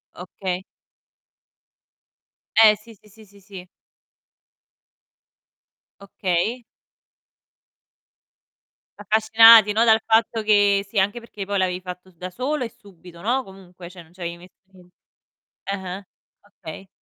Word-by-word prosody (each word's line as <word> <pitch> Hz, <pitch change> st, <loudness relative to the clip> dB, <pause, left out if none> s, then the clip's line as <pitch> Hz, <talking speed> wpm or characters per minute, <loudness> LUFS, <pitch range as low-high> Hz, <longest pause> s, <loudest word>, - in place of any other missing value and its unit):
Okay. 180 Hz, 0 st, -6 dB, 1.9 s
Eh, 220 Hz, -1 st, +7 dB
sì, 225 Hz, +2 st, -17 dB
sì, 210 Hz, -, -25 dB
sì, 220 Hz, +1 st, -18 dB
sì, 200 Hz, 0 st, -21 dB
sì. 190 Hz, -2 st, -12 dB, 2.3 s
Okay. 200 Hz, +5 st, -2 dB, 2.4 s
Affascinati, 220 Hz, +1 st, +6 dB
no, 225 Hz, +3 st, +2 dB
dal 220 Hz, -1 st, +4 dB
fatto 225 Hz, 0 st, +1 dB
che 205 Hz, -2 st, +3 dB
sì, 200 Hz, 0 st, -2 dB
anche 205 Hz, +5 st, -1 dB
perché 210 Hz, -4 st, -9 dB
poi 200 Hz, 0 st, -2 dB
l'avevi 185 Hz, -1 st, -1 dB
fatto 180 Hz, 0 st, -10 dB
da 180 Hz, +2 st, -9 dB
solo 255 Hz, +6 st, -3 dB
e -, -, -7 dB
subito, 180 Hz, -4 st, -17 dB
no, 255 Hz, +4 st, -1 dB
comunque 180 Hz, -2 st, -14 dB
cioè, 180 Hz, -1 st, -13 dB
non 160 Hz, -, -24 dB
c'avevi 170 Hz, -1 st, -7 dB
nessu 180 Hz, +1 st, -20 dB, 0.8 s
eh 195 Hz, -, -3 dB
eh, 190 Hz, +1 st, -8 dB, 0.3 s
okay. 195 Hz, -2 st, -12 dB
195 Hz, 115 wpm, -22 LUFS, 180-220 Hz, 2.4 s, Eh